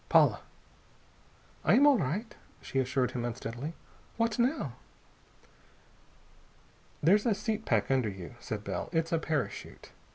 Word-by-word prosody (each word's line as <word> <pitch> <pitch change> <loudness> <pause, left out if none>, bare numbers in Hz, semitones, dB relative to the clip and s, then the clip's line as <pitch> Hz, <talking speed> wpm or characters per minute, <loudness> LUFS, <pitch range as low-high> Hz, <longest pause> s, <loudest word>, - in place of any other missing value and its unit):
"Paula?" - - +5 1.2
"I - - +5
am 280 - +6
all 285 -4 +6
right," 185 - -2 0.3
she 135 - -2
assured 130 0 +1
him 120 - -3
unsteadily. 120 +5 -4 0.4
"What 230 0 +1
now?" 240 - +1 2.3
"There's 205 +8 +5
a 220 - +3
seat 220 +1 -2
pack 115 +1 +1
under 130 -5 +2
you," 95 -3 -8
said - - -5
Bell. - - -3
"It's 165 +1 +1
a 165 - +2
parachute. 155 -2 -4
160 Hz, 130 wpm, -30 LUFS, -, 2.3 s, am